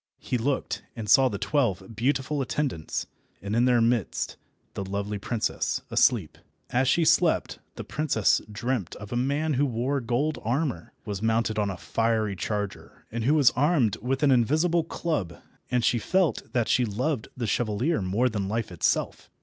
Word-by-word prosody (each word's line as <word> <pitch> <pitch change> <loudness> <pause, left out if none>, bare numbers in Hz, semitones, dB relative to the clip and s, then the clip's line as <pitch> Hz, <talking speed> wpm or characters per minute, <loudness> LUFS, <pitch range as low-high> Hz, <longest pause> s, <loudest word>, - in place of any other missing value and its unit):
He - - -3
looked, 135 +3 -1
and 110 -3 -6
saw 130 +5 +6
the 100 - -4
twelve 110 -5 -1
beautiful 135 +5 0
attendants, 130 - -2 0.3
and 100 +2 -3
in 120 +1 +4
their 125 -2 +4
midst 115 -4 0 0.4
the 100 - -4
lovely 100 +1 -3
princess, 115 +2 -2
asleep. - - +2 0.3
As 130 +2 +2
she 165 +5 +3
slept 165 +1 +2 0.2
the - - -6
princess 145 -9 +1
dreamt 120 -3 -2
of 105 +2 -8
a - - -1
man 140 +5 0
who 140 +2 +2
wore 130 +3 -1
gold 125 +6 -1
armour, 120 - -1
was 100 -3 -4
mounted 110 0 +1
on 105 -1 +1
a 95 - -4
fiery 110 0 0
charger, 105 +1 -5
and 115 0 -3
who 145 +4 +4
was 145 -5 +6
armed 140 - +2
with 130 +4 -2
an 140 - +5
invisible 155 +8 +3
club, 155 - -3 0.3
and 125 -2 +1
she 120 - +3
felt 180 - 0
that 120 -3 +1
she 125 - +3
loved 120 +4 -1
the 120 - -2
chevalier 115 +7 0
more 100 +7 +1
than 105 -5 -2
life 110 -2 -2
itself. 85 - -1
120 Hz, 170 wpm, -26 LUFS, 105-140 Hz, 0.4 s, saw